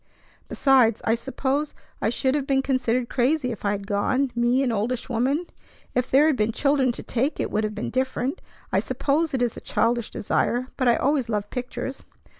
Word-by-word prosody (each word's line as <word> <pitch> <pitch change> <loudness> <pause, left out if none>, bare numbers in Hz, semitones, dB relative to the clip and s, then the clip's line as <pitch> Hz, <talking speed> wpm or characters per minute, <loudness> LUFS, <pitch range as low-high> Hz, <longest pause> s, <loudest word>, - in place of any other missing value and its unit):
Besides, 255 -6 +4
I 225 - +2
suppose 270 +4 -2 0.3
I 215 - +2
should 260 +3 0
have 280 -2 -1
been 270 -1 +2
considered 255 -2 0
crazy 255 +1 +1
if 225 - -7
I 205 - +1
had 200 -1 -2
gone, 250 +6 0
me, 240 +3 +2
an 255 - +1
oldish 230 +4 -2
woman! 260 +8 0 0.5
If 250 +1 0
there 280 +3 +5
had 310 -3 +3
been 215 -1 +1
children 275 -2 +2
to - - -7
take, 265 +5 -1
it - - -2
would 215 +1 0
have 215 0 -2
been 215 - -4
different. 260 +3 -1 0.3
I - - +4
suppose 305 +3 0
it 250 - +1
is 240 - -1
a - - -7
childish 235 -1 0
desire, 245 +4 0
but 255 - 0
I 235 - +5
always 270 -3 +1
loved 210 -2 -2
pictures." 250 +1 -5
255 Hz, 200 wpm, -24 LUFS, 230-275 Hz, 0.5 s, there